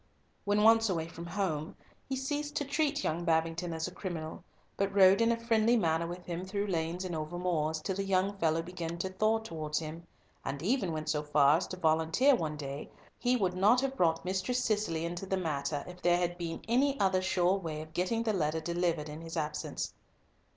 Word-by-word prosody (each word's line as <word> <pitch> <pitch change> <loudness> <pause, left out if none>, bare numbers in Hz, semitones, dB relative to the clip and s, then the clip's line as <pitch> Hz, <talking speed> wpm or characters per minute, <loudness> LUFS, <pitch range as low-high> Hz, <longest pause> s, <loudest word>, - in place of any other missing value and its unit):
When 205 +1 +2
once 225 0 +6
away 165 -3 -1
from 170 +1 -8
home, 170 -3 -2 0.3
he 265 - 0
ceased 290 +3 -3
to 290 - 0
treat 295 +1 0
young 165 +2 -1
Babington 165 +1 0
as 160 +1 -2
a 180 - -8
criminal, 170 -5 -5 0.3
but 195 0 0
rode 195 +2 +7
in 230 0 +4
a 230 - +1
friendly 230 0 +3
manner 165 -4 +1
with 175 +1 -7
him 175 0 -4
through 200 +2 -2
lanes 175 -1 -2
and 175 -2 -3
over 155 +2 -4
moors, 160 -3 0
till 190 - -2
the 195 - -1
young 195 +1 +1
fellow 165 -1 +2
began 170 -1 -5
to 185 +2 -2
thaw 215 +4 +2
towards 160 -8 -4
him, 165 +2 -5 0.4
and 140 +2 -4
even 205 -3 +1
went 155 -1 -3
so 150 -1 +1
far 150 0 +4
as 175 - -3
to 185 - -6
volunteer 160 - +3
one 155 -10 -1
day 140 0 -5
that - - -25 0.2
he 250 0 +2
would 190 -5 +1
not 205 +7 +4
have 270 0 -1
brought 165 -6 +2
Mistress 190 +7 0
Cicely 205 -7 0
into 175 +3 -4
the 190 - 0
matter 145 -4 -2
if 180 0 -10
there 175 0 +4
had 175 0 -1
been 170 -2 -5
any 270 +4 +2
other 190 -1 +3
sure 185 -1 +2
way 160 -4 -4
of 155 0 -15
getting 205 +7 0
the 220 -2 +1
letter 160 -4 0
delivered 170 -1 -1
in 150 +1 -7
his 165 +1 -6
absence. 150 -1 -3
175 Hz, 215 wpm, -31 LUFS, 160-205 Hz, 0.4 s, rode